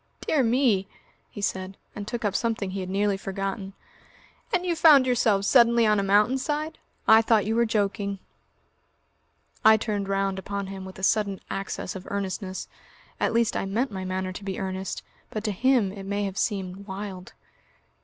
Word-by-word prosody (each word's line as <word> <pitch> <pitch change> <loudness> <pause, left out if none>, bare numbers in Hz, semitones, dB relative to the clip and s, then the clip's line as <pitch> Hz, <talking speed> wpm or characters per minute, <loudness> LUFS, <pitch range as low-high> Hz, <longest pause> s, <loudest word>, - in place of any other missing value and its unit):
"Dear 305 - +2
me!" 230 -5 +2 0.4
he 205 - -8
said, 190 -1 -3 0.2
and 205 -1 -6
took 235 -1 -3
up 205 - +1
something 220 -5 -1
he 195 - -4
had 185 -1 -4
nearly 200 +1 +1
forgotten. 195 0 -4 0.8
"And 365 -3 +1
you 345 -2 +1
found 310 -5 +7
yourselves 225 -6 +2
suddenly 235 -2 +5
on 210 -1 +3
a - - 0
mountain 210 +7 +3
side?... 305 +3 -3 0.3
I 220 0 +8
thought 225 -2 +3
you 220 +2 0
were 235 0 +3
joking." 200 -2 -1 1.5
I 220 0 +8
turned 205 -3 -2
round 195 -1 0
upon 200 +1 -4
him 190 0 -7
with 190 - -10
a 190 - -10
sudden 205 -2 +1
access 195 -1 -4
of 190 - -8
earnestness. 190 -1 -3 0.5
At - - +1
least 230 -1 +2
I - - -1
meant 230 +6 -1
my 190 -1 -5
manner 185 0 -3
to 200 - -8
be 195 -1 -4
earnest, 190 0 -4 0.3
but 215 - -4
to 215 - 0
him 235 -1 +2
it 195 -1 -8
may 205 +1 -1
have 195 -2 -3
seemed 195 -1 -2
wild. 190 -1 -7
200 Hz, 180 wpm, -26 LUFS, 195-230 Hz, 1.5 s, I